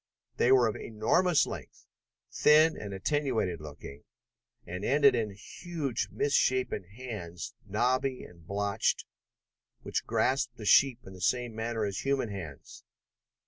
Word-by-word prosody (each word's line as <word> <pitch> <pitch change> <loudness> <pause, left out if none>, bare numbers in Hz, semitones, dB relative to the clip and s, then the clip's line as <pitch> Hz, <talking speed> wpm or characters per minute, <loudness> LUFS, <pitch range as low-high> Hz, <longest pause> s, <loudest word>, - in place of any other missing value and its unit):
There 130 +2 +5
were 125 -3 +4
of 110 - -2
enormous 145 +10 +2
length, - - -9 0.5
thin 155 +2 +5
and 100 -1 -7
attenuated 110 - -1
looking, 75 -1 -10 0.6
and 90 +3 -6
ended 140 +3 +5
in 115 -3 0
huge 135 - -4
misshapen 130 -7 +1
hands, 100 -5 -7
knobby 125 +5 0
and 85 -2 -15
blotched, 100 +2 0 0.8
which - - -3
grasped 125 -2 0
the 110 - -8
sheep 125 +4 +5
in 95 - -10
the 90 - -12
same 120 +4 0
manner 110 0 -2
as 100 -1 -3
human 135 -4 0
hands. 85 -9 -9
115 Hz, 130 wpm, -30 LUFS, 100-130 Hz, 0.8 s, There